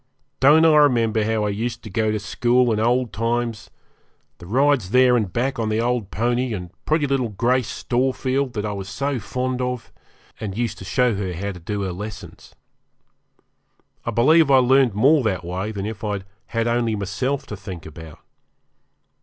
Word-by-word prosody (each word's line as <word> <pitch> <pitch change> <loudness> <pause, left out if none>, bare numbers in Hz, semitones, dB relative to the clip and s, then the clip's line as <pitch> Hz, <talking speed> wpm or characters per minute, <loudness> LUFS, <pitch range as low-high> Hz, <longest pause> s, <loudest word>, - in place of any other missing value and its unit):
Don't 150 +5 +6
I 160 -1 +6
remember 115 -7 +3
how 110 0 0
I - - 0
used 115 +4 -3
to 110 - -8
go 110 +1 0
to 105 - 0
school 120 +4 +2
in 105 - -1
old 120 +2 +1
times; 115 0 -2 0.7
the 85 - -11
rides 130 -2 +2
there 125 +2 +5
and 105 -6 0
back 125 +5 -1
on 110 -1 -1
the 110 +1 0
old 120 -3 -1
pony; 120 +1 -1
and 90 -2 -7
pretty 155 -1 +1
little 135 -4 0
Grace 120 +4 0
Storefield 130 +1 -1
that 105 -1 -3
I 105 - -2
was 100 -1 -6
so 140 +6 -2
fond 125 +3 -3
of, 125 -1 -4 0.5
and 100 -2 -5
used 115 -3 -2
to 95 - -9
show 125 +4 +2
her 95 -2 -3
how 100 +4 -4
to 90 - -10
do 100 +4 -4
her 95 -2 -3
lessons. 105 +4 -9 1.5
I - - -3
believe 145 +7 +4
I 135 - +6
learned 130 -3 +4
more 140 +8 +4
that 95 -6 -1
way 95 +5 -3
than 100 -2 -4
if 110 +1 -6
I'd 100 -3 -3 0.2
had 115 -1 -1
only 115 -2 +1
myself 125 +8 -2
to 105 - -7
think 95 -4 -9
about. 80 0 -11
115 Hz, 185 wpm, -22 LUFS, 100-125 Hz, 1.5 s, Don't